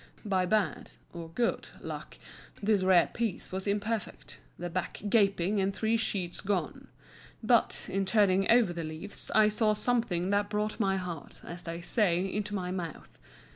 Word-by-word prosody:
By 190 -3 +1
bad 205 -3 0 0.2
(or 170 -1 -7
good) 235 +8 -1
luck - - -7 0.4
this 210 -1 +2
rare 185 -2 +4
piece 230 -6 -3
was 190 +2 -4
imperfect—the 205 -4 -4
back 185 +1 -3
gaping 200 -2 +3
and 195 +1 +1
three 220 +3 0
sheets 195 -6 -2
gone. 190 -7 -2 0.6
But, - - +2
in 195 +1 -1
turning 195 -2 +3
over 230 -6 +5
the 170 -1 -4
leaves, 160 +6 -6
I 215 -1 +7
saw 215 0 +2
something 210 -5 0
that 205 0 +1
brought 210 +1 -2
my 195 -3 +2
heart, 175 -5 -6
as 170 +1 -7
they 165 0 -5
say, 180 -2 +1
into 210 0 -2
my 180 -2 -2
mouth. 175 -4 -6
195 Hz, 155 wpm, -30 LUFS, 180-210 Hz, 0.6 s, I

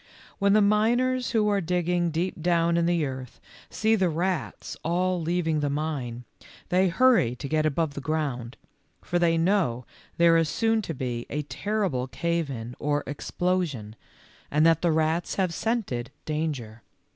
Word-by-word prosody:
When 200 -1 +3
the 215 0 +5
miners 240 +5 +2
who 220 -3 +2
are 200 -1 +2
digging 175 0 0
deep 165 +1 -2
down 170 0 +2
in 170 0 +2
the 170 -3 +2
earth 130 -2 -7 0.3
see 220 +1 +1
the 190 -5 +2
rats 175 +2 -2
all 180 +1 0
leaving 165 -1 0
the 145 -1 0
mine, 140 -5 -3 0.5
they 185 +1 +3
hurry 185 - +3
to 140 - -6
get 155 +1 +1
above 155 0 0
the 140 - -6
ground, 135 -5 -3 0.5
for 175 - 0
they 165 -1 +3
know 165 - +1 0.3
there 170 -1 +5
is 165 -2 +2
soon 225 +3 +1
to 165 -6 -5
be 120 -2 -4
a 150 +1 -2
terrible 190 -6 -2
cave 170 +2 -1
in 120 -2 -6
or 145 0 0
explosion, 145 - -2 0.5
and 150 +2 +3
that 165 -1 +4
the 170 - +2
rats 160 +2 0
have 185 -3 0
scented 195 - -2 0.2
dan 155 0 -1
ger. 115 -3 -10
165 Hz, 165 wpm, -26 LUFS, 145-185 Hz, 0.5 s, the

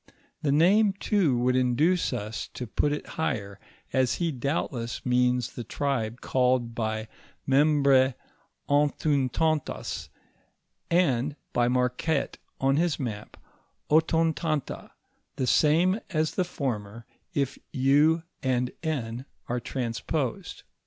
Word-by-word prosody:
The 145 - 0
nnoic, 195 +7 +4
too, 185 - +2
would 125 +1 +2
induce 140 +8 +2
us 105 +2 -4
to 125 - -4
put 145 +6 0
it 150 - -3 0.2
higher, 100 -9 -2 0.3
as 130 -1 +2
he 170 -2 -1
doubtless 125 -3 -3
means 125 -1 +2
the 120 - -6
tribe 120 -2 -2
called 125 -2 +1
by 110 -1 -2 0.4
Membr^ 140 -2 +4 0.5
Anthowtantat, 145 +1 0 0.8
and 145 -5 +2 0.2
by 120 0 +2
Marquette 125 +4 0 0.2
on 135 +1 +2
his 170 -1 +1
map, 110 -5 -5 0.5
Otontanta, 160 -1 +1 0.5
the 130 - -1
same 165 - +3
as 155 -4 0
the 185 - 0
former, 115 -8 -4 0.3
if 140 -3 -1
u 145 +5 +3 0.2
and 125 -1 0
n 130 -6 -3 0.2
are 120 +1 -1
transposed. 120 +2 -3
135 Hz, 110 wpm, -27 LUFS, 120-155 Hz, 0.8 s, nnoic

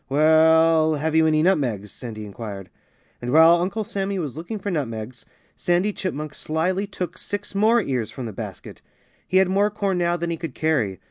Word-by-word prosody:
"Well 160 +2 +4
have 155 +2 -2
you 160 0 +5
any 155 0 +3
nutmegs?" 120 - 0
Sandy 110 -3 -8
inquired. 100 -2 -8 0.5
And 120 0 -3
while 165 +3 +6
Uncle 200 +5 -2
Sammy 200 -2 -3
was 150 -8 -4
looking 170 +8 -5
for 200 0 -4
nutmegs, 120 -6 -5 0.3
Sandy 180 +4 +1
Chipmunk 155 -6 -4
slyly 180 +7 -1
took 185 -2 -5
six 205 0 -5
more 220 +4 +4
ears 130 - -2
from 130 - -7
the 110 - -6
basket. - - -8 0.5
He 185 - +2
had 190 -1 +5
more 200 +3 +2
corn 200 -3 -1
now 175 0 +1
than 170 0 -3
he 165 - -2
could 160 -5 -6
carry. 135 -12 0
160 Hz, 185 wpm, -23 LUFS, 135-190 Hz, 0.5 s, while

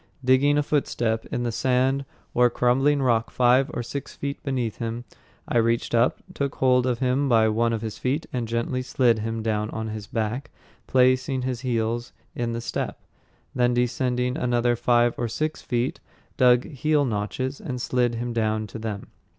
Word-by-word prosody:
Digging 135 +3 +4
a 150 - +2
footstep 120 -6 -1
in 120 - -3
the 120 - -1
sand 130 +3 +1 0.3
or 125 0 +5
crumbling 135 +4 +2
rock 115 -3 +2
five 125 +2 +3
or 120 - -3
six 140 +3 -6
feet 140 0 -4
beneath 125 -5 -2
him, 115 +1 -4 0.4
I 120 - +2
reached 115 +1 0
up, 120 +1 +2
took 140 -1 -2
hold 125 -1 +3
of 125 -2 +1
him 130 +2 +1
by 110 -2 +5
one 115 +2 +1
of 115 -1 -2
his 110 -2 -5
feet, 140 +5 -1
and 120 -2 -2
gently 115 +3 -1
slid 125 -3 +2
him 115 +1 -3
down 105 -1 -1
on 110 -1 -4
his 105 -1 -6
back, 115 +5 -3 0.4
placed 130 0 +3
his 130 -2 -2
heels 120 -1 -2 0.2
in 120 -1 -2
the 115 - -3
step, - - -3 0.5
then 125 -1 +2
descended 125 +1 0
another 120 -1 +2
five 120 0 +3
or 120 - 0
six 155 +7 -3
feet, 120 0 -1 0.4
dug 125 -1 +5
heel 150 0 +1
notches, 125 +4 -3
and 125 -3 -4
slid 120 -1 0
him 120 +1 -3
down 110 -1 0
to 110 +2 -8
them. 110 -2 -5
120 Hz, 175 wpm, -25 LUFS, 115-130 Hz, 0.5 s, or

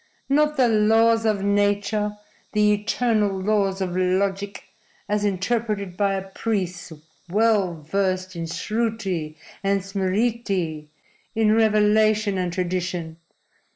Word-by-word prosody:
Not 300 +2 +2
the 255 -2 +4
laws 225 +1 +3
of 205 -2 0
nature, 205 +1 +1 0.4
the 210 0 +4
eternal 210 -2 0
laws 195 -1 0
of 180 -2 -2
logic, 195 +2 -1 0.4
as 210 0 0
interpreted 205 -1 -1
by 200 0 +1
a 195 0 -4
priest 190 -4 -3 0.4
well 200 -5 +1
versed 185 +2 -1
in 165 -1 -4
Sruti 195 -7 -2 0.3
and 195 0 +1
Smriti 195 -4 -1 0.5
in 220 -1 +3
revelation 215 -2 +3
and 180 -1 -1
tradition. 180 -2 -3
200 Hz, 110 wpm, -23 LUFS, 185-215 Hz, 0.5 s, the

